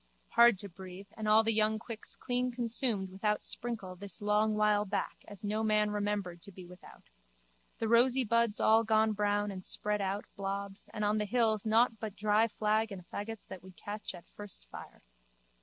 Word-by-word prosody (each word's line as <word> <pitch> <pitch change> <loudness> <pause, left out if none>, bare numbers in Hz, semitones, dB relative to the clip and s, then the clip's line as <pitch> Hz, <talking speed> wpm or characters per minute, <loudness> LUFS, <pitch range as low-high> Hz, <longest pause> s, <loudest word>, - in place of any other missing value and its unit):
Hard 235 -3 +6
to 200 - -5
breathe 190 +1 -11
and 215 -1 -4
all 215 +1 +6
the 225 0 +1
young 215 0 +2
quicks 230 0 -5
clean 250 0 -1
consumed 230 -5 -1
without 210 +2 0
sprinkle 225 -6 -3
this 195 0 -5
long 210 +1 +2
while 210 -1 +3
back 200 0 -3
as 205 0 -11
no 210 +1 -1
man 210 -1 +2
remembered 205 -4 -2
to 200 - -12
be 185 -1 -11
without. 180 +1 -15 0.7
The 225 - -1
rosy 245 +3 +4
buds 230 -1 +2
all 225 +1 +5
gone 220 0 +3
brown 205 0 0
and 185 -1 -7
spread 210 +2 0
out 195 +1 -2
blobs 195 0 -5
and 210 -1 -2
on 210 +1 +2
the 210 - 0
hills 220 -1 +1
nought 225 0 +3
but 215 -3 -5
dry 215 +2 +3
flag 215 0 0
and 180 -3 -8
faggots 220 +1 -5
that 190 - -8
would 185 -1 -15
catch 205 -1 -6
at 175 - -13
first 205 - -10
fire. - - -11
210 Hz, 190 wpm, -32 LUFS, 200-220 Hz, 0.7 s, Hard